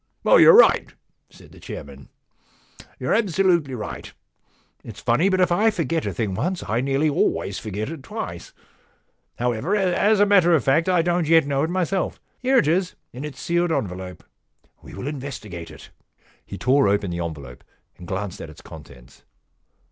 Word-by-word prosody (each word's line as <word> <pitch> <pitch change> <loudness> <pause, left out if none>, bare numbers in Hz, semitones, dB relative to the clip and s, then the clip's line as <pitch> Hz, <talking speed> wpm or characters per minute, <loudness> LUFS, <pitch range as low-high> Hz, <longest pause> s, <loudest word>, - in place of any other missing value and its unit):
* - - -39
You're 485 -2 +7
right,' - - +4 0.3
said - - -18
the - - -16
chairman; - - -10 0.5
* - - -23
you're - - -1
absolutely 180 - +1
right. 110 - -7 0.7
It's - - -10
funny, 150 +12 +2
but 185 -1 +1
if 180 -1 +2
I 210 +6 +3
forget 165 -5 -2
a - - -1
thing 110 -6 -3
once 180 - -2
I 115 +3 0
nearly 135 +3 +1
always 145 - 0
forget 105 +1 -5
it 165 -4 -8
twice. 110 - -7 0.9
However, 125 - -1
as 200 +2 +2
a 205 - +6
matter 185 -4 +4
of 145 - +1
fact, 155 +7 +2
I 180 -2 +3
don't 175 -1 0
yet 165 -2 +5
know 140 -1 -1
it 160 - 0
myself. 185 +1 -2 0.2
Here 260 +1 +2
it 150 - +3
is 180 +3 0 0.2
in 125 +4 -7
its 150 -2 -8
sealed 170 0 0
en 110 - 0
velope. 90 -1 -9 0.6
We - - -12
will 100 - -7
investigate 130 - -7
it.' - - -14 0.5
He 100 - -9
tore 130 +2 +3
open 100 -2 0
the 85 0 -3
envelope 70 -7 -8 0.3
and 90 - -12
glanced 95 -1 -5
at 75 -2 -10
the - - -15
contents. 70 -5 -14
145 Hz, 180 wpm, -22 LUFS, -, 0.9 s, You're